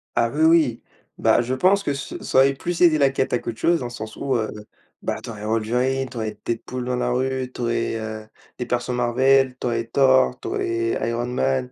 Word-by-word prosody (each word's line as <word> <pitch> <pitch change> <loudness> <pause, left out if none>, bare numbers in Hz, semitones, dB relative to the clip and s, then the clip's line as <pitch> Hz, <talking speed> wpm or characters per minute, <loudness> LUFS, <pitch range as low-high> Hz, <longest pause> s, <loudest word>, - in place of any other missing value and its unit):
Ah 115 0 +2
oui, 150 +5 0
oui! 160 -8 +4 0.3
Bah - - +3
je 125 +2 -2
pense 190 +7 +3
que 145 -7 -2
ce 140 - -7
ça - - -1
aurait 135 +1 +6
plus 170 +5 -4
aidé 160 -3 +5
la 140 -1 +5
cata 130 -2 0
à - - -6
qu'autre 115 - -6
chose 170 +5 +2
dans 125 - -4
le - - -8
sens 110 -2 -8
où, 135 -2 -1
heu, 110 -2 0 0.5
bah - - -3
tu 115 - -6
aurais 105 -1 -9
Wolverine, 125 +5 0
tu 120 -1 -10
aurais 110 -2 -4
Deadpool 125 +2 -4
dans 125 0 -1
la 125 - -1
rue, 130 0 -1
tu - - -8
aurais, 115 -1 -1
heu, 110 -1 -6 0.3
des 125 - -3
persos 125 0 -2
Marvel, 130 +2 +3
tu - - -5
aurais 115 -1 -1
Thor, 130 0 +3
tu - - -7
aurais 355 - -1
Iron 120 +1 -2
Man. 125 +1 -1
125 Hz, 230 wpm, -22 LUFS, 120-135 Hz, 0.5 s, aurait